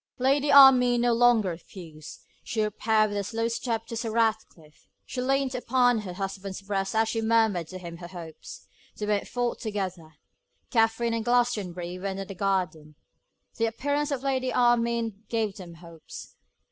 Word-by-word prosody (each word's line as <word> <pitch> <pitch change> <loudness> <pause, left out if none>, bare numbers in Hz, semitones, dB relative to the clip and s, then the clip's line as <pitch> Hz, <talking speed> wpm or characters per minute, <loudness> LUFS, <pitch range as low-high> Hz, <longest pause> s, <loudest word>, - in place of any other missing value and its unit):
Lady 275 +3 +2
Armine 260 -3 +8
no 240 0 +3
longer 230 -4 +4
refused; 165 -2 -10 0.2
she 220 -2 -1
repaired 215 +1 +1
with 205 - -2
a - - -2
slow 225 +3 -2
step 230 -1 -3
to 230 - -7
Sir 230 0 -3
Ratcliffe; 220 -9 -2 0.2
she 250 - -4
leant 270 0 0
upon 245 -1 +2
her 190 -4 -6
husband's 195 +1 -5
breast 195 0 -2
as 220 0 +3
she 225 0 -1
murmured 220 -6 +2
to 185 - -8
him 170 -2 -9
her 175 0 -9
hopes. 170 -3 -10 0.3
They 210 - -3
went 210 -1 0
forth 245 -1 -2
together. 185 -7 -5 0.6
Katherine 225 0 +2
and 230 -1 -1
Glastonbury 205 -8 -1
were 195 - -4
in 190 -1 -4
the 195 - -7
garden. 180 -6 -2 0.6
The 230 - +1
appearance 285 +6 -1
of 275 -3 -3
Lady 260 -2 0
Armine 235 -3 +1
gave 220 -3 -1
them 175 -3 -10
hopes. 165 -1 -12
220 Hz, 165 wpm, -27 LUFS, 185-240 Hz, 0.6 s, Armine